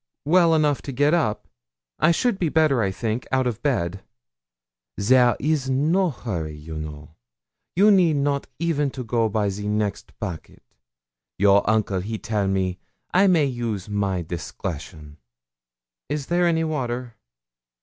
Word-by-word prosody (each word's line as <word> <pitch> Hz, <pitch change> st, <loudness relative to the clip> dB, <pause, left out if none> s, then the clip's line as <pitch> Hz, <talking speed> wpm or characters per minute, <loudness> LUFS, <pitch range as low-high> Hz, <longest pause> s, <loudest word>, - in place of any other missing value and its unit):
'Well 170 Hz, +1 st, +4 dB
enough 150 Hz, -3 st, +2 dB
to 140 Hz, -, -6 dB
get 145 Hz, +4 st, +2 dB
up; 110 Hz, -11 st, 0 dB, 0.5 s
I -, -, +4 dB
should 200 Hz, +4 st, +1 dB
be 170 Hz, -, +1 dB
better, 150 Hz, -5 st, +3 dB
I 100 Hz, -, +1 dB
think, 110 Hz, +5 st, -3 dB
out 130 Hz, 0 st, +2 dB
of 120 Hz, -2 st, -2 dB
bed.' 95 Hz, -10 st, -1 dB, 1.0 s
'There 125 Hz, +3 st, +4 dB
is 145 Hz, -2 st, 0 dB
no 160 Hz, +8 st, +2 dB
hurry, 85 Hz, -, -5 dB
you 80 Hz, +1 st, -9 dB
know; 75 Hz, 0 st, -9 dB, 0.6 s
you 205 Hz, +4 st, +6 dB
need 175 Hz, -6 st, +4 dB
not 140 Hz, 0 st, 0 dB
even 150 Hz, -3 st, 0 dB
go 120 Hz, -3 st, -1 dB
by 105 Hz, 0 st, 0 dB
the 105 Hz, +1 st, -5 dB
next 105 Hz, -1 st, -3 dB
packet. 90 Hz, -11 st, -7 dB, 0.7 s
Your 100 Hz, +1 st, +4 dB
uncle, 105 Hz, -3 st, +1 dB
he 110 Hz, +4 st, -4 dB
tell 105 Hz, -2 st, -1 dB
me, 95 Hz, -2 st, -1 dB, 0.3 s
I 190 Hz, +2 st, +5 dB
may 170 Hz, -6 st, +4 dB
use 115 Hz, -7 st, -3 dB
my 100 Hz, -3 st, -1 dB
discretion.' 80 Hz, -2 st, -7 dB, 0.9 s
'Is 145 Hz, -1 st, -2 dB
there 175 Hz, +2 st, +2 dB
any 165 Hz, -1 st, +2 dB
water?' 125 Hz, -6 st, -3 dB
120 Hz, 145 wpm, -23 LUFS, 100-150 Hz, 1.0 s, you